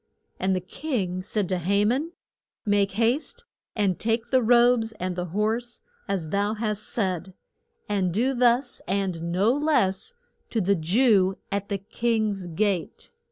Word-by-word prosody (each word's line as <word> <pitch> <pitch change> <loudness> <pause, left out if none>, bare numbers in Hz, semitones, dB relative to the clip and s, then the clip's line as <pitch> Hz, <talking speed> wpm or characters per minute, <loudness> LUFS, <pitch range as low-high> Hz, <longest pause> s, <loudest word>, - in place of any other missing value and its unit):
And 190 0 +1
the 185 - -1
king 185 - -3
said 205 0 -1
to 185 -1 0
Ha 200 +4 +2
man, 280 +10 0 0.5
Make 200 -2 +2
haste 235 - 0 0.3
and 200 -4 +1
take 225 +1 -1
the 260 -1 +4
robes 235 -1 +4
and 185 -3 -4
the 180 0 -2
horse 220 +6 -2 0.3
as 190 -6 -2
thou 205 +4 0
hast 215 -1 -2
said, 185 -4 -2 0.5
and 195 -4 0
do 245 +9 +1
thus 245 +1 +2
and 180 -3 -1
no 200 +7 +3
less 295 - +1 0.3
to 230 - 0
the 200 0 +3
Jew 195 +2 +3
at 200 0 -2
the 200 - 0
king's 210 -1 -1
gate. 180 +1 -2
205 Hz, 150 wpm, -25 LUFS, 185-235 Hz, 0.5 s, the